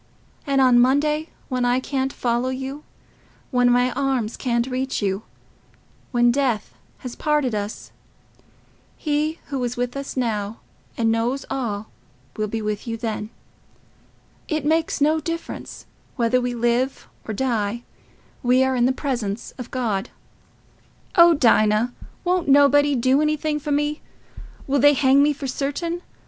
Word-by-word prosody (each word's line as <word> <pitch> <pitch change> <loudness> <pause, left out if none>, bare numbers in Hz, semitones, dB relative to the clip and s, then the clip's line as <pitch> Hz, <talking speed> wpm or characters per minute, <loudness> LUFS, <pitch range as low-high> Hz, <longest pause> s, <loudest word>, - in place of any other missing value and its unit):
And 275 -1 +2
on 250 -2 +6
Monday, 300 +5 +2 0.2
when 255 -2 -1
I 245 +1 +2
can't 265 0 -2
follow 240 0 -1
you—when 260 -2 -4
my 245 +1 +3
arms 255 -4 -1
can't 235 -2 0
reach 260 +1 -2
you—when 220 +4 -3
death 250 -5 0 0.3
has 245 - -5
parted 300 -5 0
us—He 295 +8 -6
who 270 -3 -2
is 245 0 -3
with 245 +1 -2
us 275 -1 -5
now, 220 -3 -2 0.4
and 225 -1 +2
knows 235 +4 -1
all, 220 -6 -3 0.4
will 215 0 -1
be 220 +1 -4
with 210 +2 -3
you 230 0 -3
then. 220 -2 -4 1.2
It 310 -3 -2
makes 320 0 +1
no 310 +2 +3
difference—whether 255 -6 -3
we 245 0 -2
live 240 +3 0 0.2
or 215 - -3
die, 235 -2 -1 0.6
we 250 +1 +4
are 265 0 +1
in 245 0 +3
the - - +3
presence 240 -6 -3
of 245 - -6
God." 225 -4 -2 1.1
"Oh, 340 -1 +7
Dinah, 225 -3 +3 0.3
won't 360 -2 0
nobody 285 +1 +5
do 260 +3 +3
anything 305 0 0
for 295 0 -4
me? 295 +1 0 0.6
Will 280 +1 +1
they 290 +2 +6
hang 270 0 +4
me 295 +1 +4
for 285 -1 -6
certain?... 290 +6 -2
255 Hz, 135 wpm, -22 LUFS, 235-285 Hz, 1.2 s, Oh